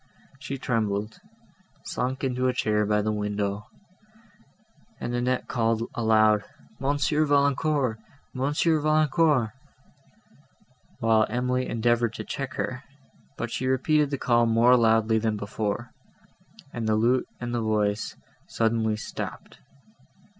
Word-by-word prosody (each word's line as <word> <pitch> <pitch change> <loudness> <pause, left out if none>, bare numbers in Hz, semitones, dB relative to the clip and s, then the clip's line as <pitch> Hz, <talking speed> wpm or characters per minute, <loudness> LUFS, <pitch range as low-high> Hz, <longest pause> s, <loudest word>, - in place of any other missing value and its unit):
She 135 0 -5
trembled, 110 -4 -2 0.7
sunk 130 +2 -3
into 130 -1 0
a 125 - +1
chair 105 -1 +1
by 105 0 +2
the 110 - 0
window, 105 0 -2 1.3
and 120 - -4
Annette 125 +1 -1
called 115 -1 0
aloud, 110 -2 +3 0.4
"Monsieur 145 +2 +1
Valancourt! 140 -4 +1 0.3
Monsieur 150 +4 +1
Valancourt!" 155 -5 +2 1.5
while 110 -1 +3
Emily 125 +2 -1
endeavoured 120 0 +1
to - - -6
check 135 -2 -5
her, 130 +1 -3 0.5
but 115 0 -4
she 130 - -2
repeated 145 +3 +2
the 140 - -2
call 120 -2 +2
more 115 +2 +5
loudly 110 -1 +3
than 110 -1 -1
before, 105 +3 -3 0.8
and 115 -2 -3
the 110 - +2
lute 120 +4 +2
and 120 -1 -4
the 120 - 0
voice 105 -1 0 0.3
suddenly 110 -1 0
stopped. - - -7
120 Hz, 120 wpm, -26 LUFS, 110-130 Hz, 1.5 s, more